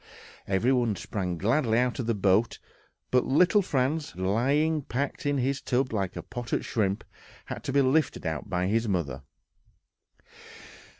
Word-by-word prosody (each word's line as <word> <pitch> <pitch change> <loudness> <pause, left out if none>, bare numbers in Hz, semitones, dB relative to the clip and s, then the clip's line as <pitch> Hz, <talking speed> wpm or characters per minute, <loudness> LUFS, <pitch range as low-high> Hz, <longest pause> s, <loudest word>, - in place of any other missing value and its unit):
Everyone 115 +3 +2
sprang 90 -1 -3
gladly 115 - +2
out 125 +1 +1
of 120 - -2
the 115 - +1
boat 100 +3 +2 0.5
but 125 -1 +4
little 175 +8 +4
Franz, 145 -1 0
who, 95 +2 -5
lying 145 +10 +2
packed 140 +2 -3
in 145 0 +1
his 135 +2 0
tub 130 -1 0
like 95 -3 -2
a - - -5
potted 120 -1 -3
shrimp, 100 -3 -1 0.4
had - - -7
to - - -1
be 140 0 +4
lifted 135 - +1
out 80 -2 -3
by 90 -1 0
his 110 +4 +1
mother.... 75 -9 -2
120 Hz, 155 wpm, -27 LUFS, 95-135 Hz, 0.5 s, but